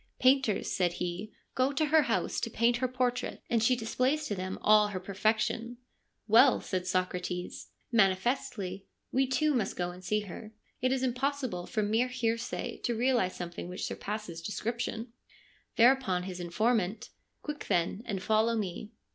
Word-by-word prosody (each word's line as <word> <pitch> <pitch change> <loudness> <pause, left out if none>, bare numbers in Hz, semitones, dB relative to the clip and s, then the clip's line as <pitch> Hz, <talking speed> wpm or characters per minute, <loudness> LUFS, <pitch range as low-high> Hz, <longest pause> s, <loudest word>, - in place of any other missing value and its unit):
' - - -45
Painters,' 260 -5 +3
said 175 -2 +1
he, 180 +4 -4
' - - -46
go 260 +2 +2
to 285 +2 +1
her 310 +1 +5
house - - 0
to - - -1
paint 235 +1 +2
her 255 +1 0
portrait, 250 -1 -2
and 230 -1 +3
she 250 +3 +4
displays 255 +6 0
to 215 - -2
them 185 -1 -4
all 210 0 +6
her 200 -3 -4
perfection! 220 +5 -1
' - - -45
' - - -49
Well,' 240 +5 +6
said 185 -1 -3
Socrates, 180 -1 -2
' - - -43
manifestly, 195 -1 0 0.2
we 265 +1 +2
too 295 +4 +2
must 225 -7 0
go 175 0 -2
and 180 +1 -12
see 210 +3 +1
her. 210 +2 -9 0.3
It 255 +1 +2
is 265 -1 0
impossible 255 -7 -1
from 210 -2 -1
mere 235 +3 +3
hearsay 235 -1 -2
to 240 - 0
realise 240 -6 +2
something 175 0 -6
which 180 - -4
surpasses 205 -5 -5
description. 230 +4 -3 0.3
' - - -33
Thereupon 235 -7 +4
his 180 -1 -6
informant: 210 +3 0
' - - -49
Quick, 300 -1 -5
then, 175 +4 +1
and 195 -4 -3
follow 220 +2 +3
me.' 210 +1 -4
220 Hz, 180 wpm, -30 LUFS, 185-250 Hz, 0.3 s, all